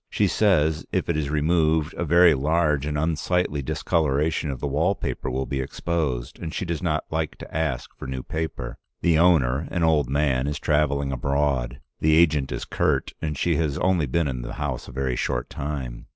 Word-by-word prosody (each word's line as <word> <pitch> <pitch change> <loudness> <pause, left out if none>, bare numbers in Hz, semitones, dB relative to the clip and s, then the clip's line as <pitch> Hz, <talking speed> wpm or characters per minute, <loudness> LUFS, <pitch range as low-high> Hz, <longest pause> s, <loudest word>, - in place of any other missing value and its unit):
She - - +1
says 80 -7 +2
if - - -1
it 85 - +1
is 75 -2 -1
removed, 80 0 +2
a - - -3
very 85 +1 +6
large 75 0 +1
and 75 -1 -2
unsightly 80 0 0
discoloration 75 +2 0
of 65 -3 -4
the - - -3
wall 80 +8 +1
paper - - -4
will 65 +1 -2
be 70 -1 -2
exposed, 65 -4 -3
and 80 -2 -5
she 95 - -3
does 85 -3 -3
not 80 -3 0
like 80 -1 -2
to - - -11
ask 80 -6 -2
for - - -8
new 65 -1 -4
paper. 80 -1 -4 0.2
The 85 -2 +3
owner, 75 -5 +3
an 85 -1 -1
old 75 -5 +3
man, 70 -2 +1
is 75 - -2
traveling 70 -2 +1
abroad, 65 -2 -1 0.2
the 80 0 +4
agent 75 -5 +3
is - - -3
curt, - - 0
and 75 -2 -2
she 85 +1 +1
has 75 -4 0
only 90 -5 +2
been 80 +5 +1
in 65 -3 -3
the - - -6
house - - -4
a - - -9
very 65 -2 -1
short - - -2
time. 70 -4 -5
75 Hz, 195 wpm, -24 LUFS, 70-80 Hz, 0.2 s, very